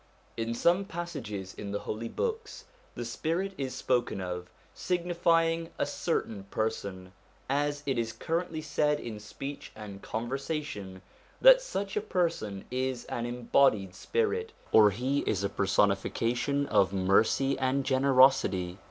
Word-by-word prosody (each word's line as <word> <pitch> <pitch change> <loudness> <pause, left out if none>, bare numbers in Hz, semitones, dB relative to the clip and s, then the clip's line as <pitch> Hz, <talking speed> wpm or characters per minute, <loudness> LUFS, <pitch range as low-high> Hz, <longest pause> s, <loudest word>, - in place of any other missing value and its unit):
In 115 +1 -2
some 175 +9 +3
passages 140 - -5
in 100 -1 -6
the 100 - -2
Holy 115 +2 -4
Books 455 +1 -3 0.3
the - - -4
Spirit 185 +5 -2
is 130 -6 -4
spoken 125 -5 0
of, 90 -1 -5 0.2
signifying 170 -2 +1
a - - +1
certain 100 -3 -2
person; 100 -3 -3 0.4
as 145 +1 0
it 135 -3 0
is 115 -1 -1
currently 165 +6 -2
said 150 0 +1
in 110 -3 -6
speech 135 +7 -7
and 105 -2 -9
conversation 120 - -4 0.4
that - - +8
such 200 - -4
a 210 - +1
person 165 - -1
is 130 -1 -2
an 120 0 -2
embodied 120 -5 +2
spirit, 450 - -1 0.2
or 105 -1 +7
he 130 +8 -1
is 100 -2 0
a 100 - +1
personification 115 +8 +1
of 95 -8 +3
mercy 100 +8 +3
and 130 +1 +1
generosity. 130 -9 +4
130 Hz, 135 wpm, -29 LUFS, 105-165 Hz, 0.4 s, that